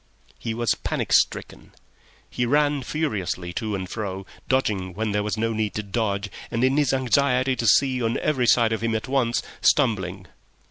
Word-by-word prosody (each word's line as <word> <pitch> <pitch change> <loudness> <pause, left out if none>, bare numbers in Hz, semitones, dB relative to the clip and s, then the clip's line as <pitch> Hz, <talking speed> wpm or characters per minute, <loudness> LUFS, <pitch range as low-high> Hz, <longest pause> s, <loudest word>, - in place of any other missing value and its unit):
He 115 -1 -3
was 120 0 +1
panic - - -3
stricken. - - 0 0.5
He 120 -1 -2
ran 145 +1 +2
furiously 100 - -3
to 110 +1 -2
and 95 -1 -4
fro, 95 -2 -5 0.2
dodging 100 -9 0
when 110 +1 -1
there 105 0 +1
was 105 +1 -2
no 115 +1 0
need 110 -1 -2
to 105 - -2
dodge, 100 -1 -2 0.2
and, 115 +1 -1
in 130 +1 +3
his 145 -3 +3
anxiety 130 0 +2
to 115 - -1
see 130 +3 +4
on 115 0 0
every 130 -5 0
side 115 -2 +4
of 110 - -2
him 115 -1 0
at 110 - -3
once, 130 -3 +1 0.2
stumbling. 95 -9 +1
115 Hz, 180 wpm, -24 LUFS, 105-130 Hz, 0.5 s, see